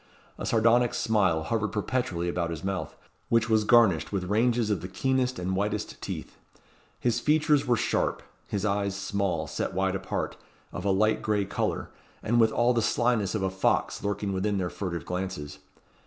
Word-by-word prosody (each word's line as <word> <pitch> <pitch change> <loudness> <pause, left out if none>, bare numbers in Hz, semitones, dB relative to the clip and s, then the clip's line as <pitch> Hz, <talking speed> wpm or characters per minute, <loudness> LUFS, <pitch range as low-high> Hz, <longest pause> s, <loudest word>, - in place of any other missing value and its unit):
A - - -3
sardonic 115 +1 +3
smile 95 -8 +2
hovered 110 +3 0
perpetually 105 -5 -1
about 85 -1 -1
his 80 -2 -5
mouth, 95 -1 -3 0.3
which 115 -1 +2
was 110 -1 +4
garnished 110 -7 +4
with 100 -2 -1
ranges 115 +3 +1
of 100 - 0
the 90 - -5
keenest 130 +5 0
and 90 +1 -2
whitest 105 +2 -2
teeth. - - -6 0.6
His 120 -1 +1
features 150 0 +2
were 120 -1 +3
sharp; - - 0 0.2
his 100 0 -2
eyes 100 -1 0
small, 100 -1 -1
set - - -3
wide - - +1
apart, - - -3 0.4
of 90 - -5
a - - +2
light 110 +3 +2
gray 105 -2 0
colour, 95 - -2 0.3
and 120 +2 +2
with 110 -1 +5
all 120 +2 +3
the 115 - +1
slyness 115 -2 +1
of 105 - -1
a 95 - 0
fox 95 0 0
lurking 100 0 -2
within 100 +2 0
their 90 -2 -2
furtive 90 -4 -4
glances. 90 -6 -4
105 Hz, 175 wpm, -27 LUFS, 95-115 Hz, 0.6 s, with